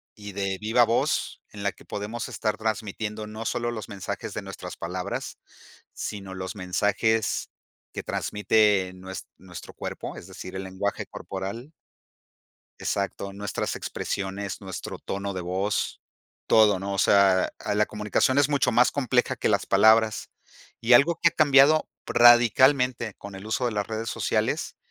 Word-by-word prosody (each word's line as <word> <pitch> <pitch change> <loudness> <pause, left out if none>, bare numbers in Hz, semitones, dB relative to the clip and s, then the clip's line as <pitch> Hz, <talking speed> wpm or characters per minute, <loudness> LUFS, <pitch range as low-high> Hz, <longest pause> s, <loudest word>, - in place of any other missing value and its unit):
y 105 -1 -9
de 95 -1 -2
viva 115 +3 +3
voz 115 +1 0
en 105 - -9
la 100 -1 0
que - - -19
podemos 115 +5 -5
estar 110 -3 -2
transmitiendo 110 -1 -3
no 110 +1 -7
solo 120 +1 -1
los 110 -4 -6
mensajes 100 -3 -5
de - - -4
nuestras - - -8
palabras, 90 +2 -5 0.6
sino 95 -2 -6
los 95 -1 -6
mensajes 105 +4 0 0.4
que - - -5
transmite 105 -3 +1
nues 95 +1 -8
nuestro - - -10
cuerpo, - - -6
es - - -10
decir, 95 - -9
el 95 0 -4
lenguaje 95 +2 -3
corporal. 100 +9 -6 1.1
Exacto, 100 0 -2
nuestras 100 +1 -3
expresiones, 100 0 -4
nuestro 95 -2 -7
tono 100 +1 -4
de 95 - -4
voz, 95 +4 -2 0.5
todo, 105 -4 +5
¿no? 100 +1 -3
O - - -3
sea, 95 -2 +4
a 105 - -2
la 105 0 +3
comunicación 105 +5 0
es 145 -1 +4
mucho 140 -4 +2
más 120 +2 +5
compleja 130 -1 +1
que - - 0
las 100 -2 +2
palabras. 110 +2 +4 0.5
Y 115 +2 +2
algo 155 +7 +6
que 170 - +7
ha - - -7
cambiado 150 0 +5 0.2
radicalmente 120 0 +5
con 100 -1 -10
el 95 +2 -9
uso 110 +3 -1
de 120 - -1
las 105 -1 -1
redes 110 0 -4
sociales - - -1
105 Hz, 155 wpm, -26 LUFS, 100-120 Hz, 1.1 s, que